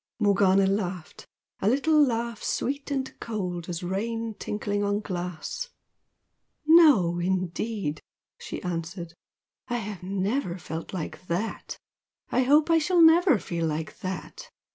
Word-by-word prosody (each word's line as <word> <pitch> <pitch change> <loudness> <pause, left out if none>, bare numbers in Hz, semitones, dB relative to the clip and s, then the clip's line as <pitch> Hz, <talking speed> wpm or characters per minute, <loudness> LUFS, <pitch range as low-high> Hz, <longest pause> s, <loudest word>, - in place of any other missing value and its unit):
Morgana 195 -2 +4
laughed 190 -4 -3 0.3
a 200 - +2
little 300 +4 +4
laugh 235 -3 -1
sweet 280 +3 -2
and 265 -2 -2
cold 180 -6 -4
as 175 +1 -4
rain 225 +5 -2
tinkling 205 -1 -3
on 205 0 +1
glass. 180 - -5 1.0
"No, 290 - +6
indeed!" 185 -1 -2 0.4
she - - -7
answered 170 0 -4 0.5
"I 240 -1 -1
have 210 -4 -6
never 195 +2 -1
felt 160 -1 -6
like 180 0 -6
THAT! 180 +6 -3 0.5
I 255 - +3
hope 295 +5 +4
I 330 - +5
shall 340 +2 +4
never 325 - +6
feel 170 -4 -2
like 155 +1 -4
THAT! 190 - -6
205 Hz, 125 wpm, -26 LUFS, 180-255 Hz, 1.0 s, No